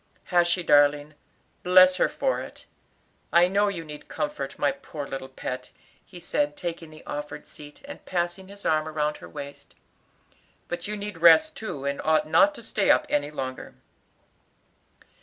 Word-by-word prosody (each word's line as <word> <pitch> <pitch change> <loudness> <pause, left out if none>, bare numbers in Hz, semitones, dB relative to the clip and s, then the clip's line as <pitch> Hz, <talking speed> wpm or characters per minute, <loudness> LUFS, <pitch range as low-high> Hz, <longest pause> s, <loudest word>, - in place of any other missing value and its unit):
"Has 175 -1 +5
she, 175 +1 0
darling? 145 0 +4 0.5
Bless 185 0 +6
her - - +2
for - - -1
it! - - -11 0.7
I 175 +1 +6
know 200 +2 +2
you 175 -5 -4
need 150 -1 -10
comfort, 145 -1 -4
my 145 - +2
poor 140 +1 -8
little 135 -1 -6
pet," 130 -1 -6 0.3
he 180 - -13
said, 295 - -1
taking 170 - -5
the 155 0 -15
offered 150 0 -6
seat, 145 0 -13
and 285 - -10
passing 175 +1 -3
his 200 +1 -13
arm 155 0 +1
round 150 -1 -1
her - - -12
waist. 140 -1 -10 0.9
"But 175 - -5
you 210 0 -4
need 205 -3 -6
rest 170 - +6
too, 145 -11 -6
and 140 0 -2
ought 155 -1 +2
not 295 - +4
to 235 - -11
stay 210 -2 0
up - - +5
any 145 0 0
longer." 130 -3 -6
160 Hz, 165 wpm, -26 LUFS, 145-185 Hz, 0.9 s, Bless